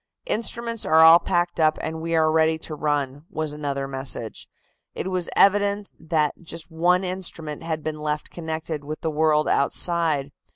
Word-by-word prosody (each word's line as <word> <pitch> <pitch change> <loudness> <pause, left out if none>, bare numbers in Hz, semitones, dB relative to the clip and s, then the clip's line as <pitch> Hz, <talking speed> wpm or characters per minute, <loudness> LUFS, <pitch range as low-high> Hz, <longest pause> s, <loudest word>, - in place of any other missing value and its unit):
"Instruments 230 - -2
are 160 +1 +4
all 165 +1 +9
packed 175 0 -1
up, 155 -1 +3
and 160 0 -4
we 165 0 -1
are 160 -1 +3
ready 160 0 +3
to 160 - -8
run," 145 -2 -2
was 155 -1 -3
another 140 -2 -3
message. 130 -4 -3 0.5
It 190 - -4
was 180 -2 -2
evident 200 0 +3
that 155 -2 0
just 165 0 -7
one 175 +3 +2
instrument 175 -5 -4
had 160 -2 -4
been 155 -1 -4
left 150 0 -3
connected 160 -2 -5
with 155 +2 -6
the 160 - -1
world 155 0 +2
outside. 150 -1 +1
160 Hz, 165 wpm, -24 LUFS, 150-170 Hz, 0.5 s, all